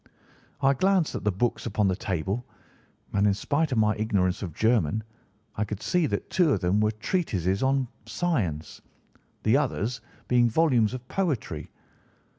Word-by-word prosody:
"I 135 Hz, 0 st, +4 dB
glanced 185 Hz, +2 st, +2 dB
at -, -, -4 dB
the 105 Hz, -, +3 dB
books 120 Hz, +5 st, -1 dB
upon 105 Hz, -2 st, +1 dB
the 95 Hz, -, +1 dB
table, 95 Hz, +5 st, -2 dB, 0.7 s
and 100 Hz, +1 st, +3 dB
in 100 Hz, -, +3 dB
spite 145 Hz, +8 st, 0 dB
of 125 Hz, -, 0 dB
my 105 Hz, -1 st, +3 dB
ignorance 100 Hz, -4 st, 0 dB
of 95 Hz, -5 st, -4 dB
German 110 Hz, -3 st, +2 dB, 0.5 s
I 105 Hz, -, 0 dB
could 105 Hz, -1 st, -5 dB
see 175 Hz, +3 st, +1 dB
that -, -, -3 dB
two 175 Hz, -6 st, +3 dB
of -, -, 0 dB
them 90 Hz, +3 st, +1 dB
were 105 Hz, 0 st, +3 dB
treatises 105 Hz, -, -1 dB
on 135 Hz, -1 st, +2 dB, 0.2 s
science, 95 Hz, -, -2 dB, 0.6 s
the 110 Hz, +5 st, +4 dB
others 125 Hz, -4 st, -1 dB, 0.3 s
being 120 Hz, -1 st, +4 dB
volumes 125 Hz, -5 st, +3 dB
of 125 Hz, -1 st, -9 dB
poetry. 170 Hz, -, -2 dB
110 Hz, 160 wpm, -27 LUFS, 100-140 Hz, 0.7 s, I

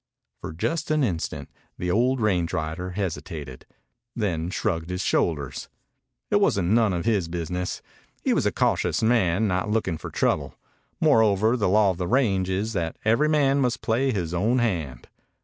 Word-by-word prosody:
For -, -, -6 dB
just 160 Hz, -, -2 dB
an 155 Hz, -1 st, +2 dB
instant 90 Hz, -9 st, -2 dB, 0.3 s
the 90 Hz, 0 st, -2 dB
old 125 Hz, +6 st, +2 dB
range 90 Hz, -6 st, +1 dB
rider 80 Hz, +4 st, -3 dB
hesitated, 80 Hz, -8 st, -5 dB, 0.5 s
then 90 Hz, -7 st, -1 dB
shrugged 85 Hz, -4 st, -2 dB
his 90 Hz, +1 st, -2 dB
shoulders. 70 Hz, -5 st, -1 dB, 0.6 s
It -, -, +5 dB
was -, -, +2 dB
none 105 Hz, +4 st, +2 dB
of 85 Hz, -2 st, -2 dB
his 105 Hz, -7 st, +1 dB
business. 90 Hz, +2 st, -4 dB, 0.4 s
He -, -, +2 dB
was -, -, +1 dB
a -, -, +1 dB
cautious -, -, 0 dB
man, 110 Hz, -3 st, +2 dB
not 90 Hz, +1 st, -1 dB
looking 100 Hz, -7 st, -1 dB
for -, -, -7 dB
trouble. -, -, -1 dB, 0.4 s
Moreover, 110 Hz, +1 st, +4 dB
the 105 Hz, -6 st, +1 dB
law 105 Hz, 0 st, +4 dB
of 90 Hz, -, -6 dB
the 90 Hz, -, -2 dB
range 100 Hz, -7 st, +1 dB
is 100 Hz, +4 st, -1 dB
that 85 Hz, -4 st, -2 dB
every 115 Hz, +8 st, +3 dB
man 140 Hz, -2 st, +3 dB
must 125 Hz, -2 st, -1 dB
play 130 Hz, +4 st, +1 dB
his 90 Hz, -7 st, -3 dB
own 110 Hz, +8 st, +1 dB
hand. 80 Hz, -, -2 dB
95 Hz, 165 wpm, -25 LUFS, 85-115 Hz, 0.6 s, It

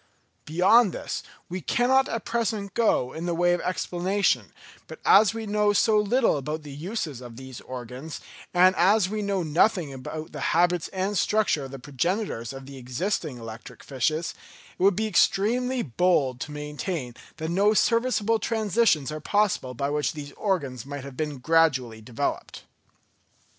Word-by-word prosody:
Beyond 185 Hz, +6 st, +4 dB
this -, -, -4 dB, 0.3 s
we 180 Hz, +1 st, -5 dB
cannot 260 Hz, +6 st, +2 dB
at 230 Hz, -, -4 dB
present 220 Hz, -4 st, -2 dB
go 210 Hz, -, +1 dB
in 165 Hz, +2 st, -5 dB
the 170 Hz, -, 0 dB
way 175 Hz, +1 st, +3 dB
of 175 Hz, -, -1 dB
explanation; 185 Hz, +2 st, 0 dB, 0.4 s
but -, -, -10 dB
as 215 Hz, +2 st, +6 dB
we 225 Hz, -1 st, -4 dB
know 210 Hz, 0 st, +2 dB
so 215 Hz, +1 st, +4 dB
little 225 Hz, -, +2 dB
about 150 Hz, +3 st, -4 dB
the 145 Hz, -, -9 dB
uses 155 Hz, -, -4 dB
of 120 Hz, -2 st, -10 dB
these 130 Hz, -2 st, -9 dB
organs, 130 Hz, +4 st, -7 dB, 0.3 s
and 185 Hz, +1 st, +5 dB
as 190 Hz, +3 st, +4 dB
we 215 Hz, +1 st, -2 dB
know 200 Hz, -3 st, -1 dB
nothing 165 Hz, -1 st, +2 dB
about 155 Hz, +4 st, -7 dB
the 150 Hz, -, -7 dB, 0.2 s
habits 175 Hz, -1 st, +2 dB
and 195 Hz, +2 st, -2 dB
structure 210 Hz, -9 st, +1 dB
of -, -, -8 dB
the 135 Hz, -, -8 dB
progenitors 145 Hz, -, -2 dB
of 135 Hz, 0 st, -9 dB
the 140 Hz, 0 st, -10 dB
existing 130 Hz, +3 st, -3 dB
electric 115 Hz, -1 st, -10 dB
fishes, 155 Hz, +5 st, -1 dB, 0.4 s
it -, -, -13 dB
would 195 Hz, 0 st, +5 dB
be 220 Hz, -, 0 dB
extremely 235 Hz, +5 st, +2 dB
bold 135 Hz, -2 st, +1 dB
to 150 Hz, -, -5 dB
maintain 150 Hz, -2 st, -4 dB, 0.2 s
that 160 Hz, 0 st, -4 dB
no 205 Hz, +4 st, +3 dB
serviceable 230 Hz, -1 st, +2 dB
transitions 215 Hz, -, +1 dB
are 155 Hz, -, -5 dB
possible 195 Hz, -9 st, 0 dB
by 140 Hz, +3 st, -2 dB
which 150 Hz, 0 st, 0 dB
these 145 Hz, -2 st, -8 dB
organs 140 Hz, -, -2 dB
might 145 Hz, 0 st, -7 dB
have 140 Hz, -2 st, -9 dB
been 150 Hz, 0 st, -3 dB
gradually 130 Hz, -6 st, +2 dB
developed. 115 Hz, +1 st, -4 dB
170 Hz, 165 wpm, -26 LUFS, 140-205 Hz, 0.4 s, as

